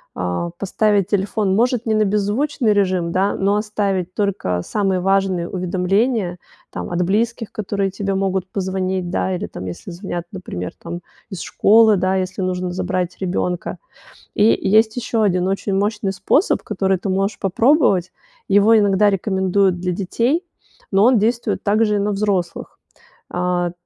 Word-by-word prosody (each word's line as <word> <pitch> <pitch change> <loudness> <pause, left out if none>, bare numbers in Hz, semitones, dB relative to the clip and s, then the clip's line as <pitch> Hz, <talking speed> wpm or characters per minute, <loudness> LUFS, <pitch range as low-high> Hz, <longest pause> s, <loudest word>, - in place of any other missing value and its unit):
э, 90 - -2
поставить 200 0 +1
телефон, 200 0 0
может, 240 +1 +1
не 220 - +1
на 215 0 +3
беззвучный 210 +4 +1
режим, 185 -4 +1
да, 190 +3 +1
но 200 +1 +1
оставить 200 -4 -2
только 195 - -1
самые 195 - 0
важные 190 -2 +1
уведомления, 185 +2 0 0.3
там, - - -5
от 175 0 0
близких, 225 +4 -1
которые 200 -2 -2
тебе 195 0 -2
могут 190 -1 -1
позвонить, 185 -1 -2
да, 185 0 -1
или 175 - -4
там, 90 - -8
если 90 - -7
звонят, 175 -1 -5
например, 90 - -6
там, 170 +1 -6 0.3
из 190 -5 -6
школы, 220 0 +4
да, 185 +1 +1
если 185 0 -2
нужно 185 -1 -2
забрать 180 0 -2
ребёнка. 180 -1 -2 0.6
И 205 - +3 0.3
есть 220 +2 +4
ещё 235 -2 -1
1 185 -3 +1
очень 195 +1 -2
мощный 205 0 -1
способ, 200 - +1
который 190 -2 0
ты 195 - -4
можешь 195 +2 0
попробовать. 200 - +2 0.4
Его 205 +3 +5
иногда 205 0 +4
рекомендуют 190 -1 +1
для 180 +1 -1
детей, 235 - -1 0.5
но 195 0 +4
он 250 0 +5
действует 230 +3 0
также 210 +1 +2
и - - +1
на 205 +1 0
взрослых. 195 -4 -2 0.5
А. 175 0 -1
195 Hz, 150 wpm, -20 LUFS, 185-210 Hz, 0.6 s, Его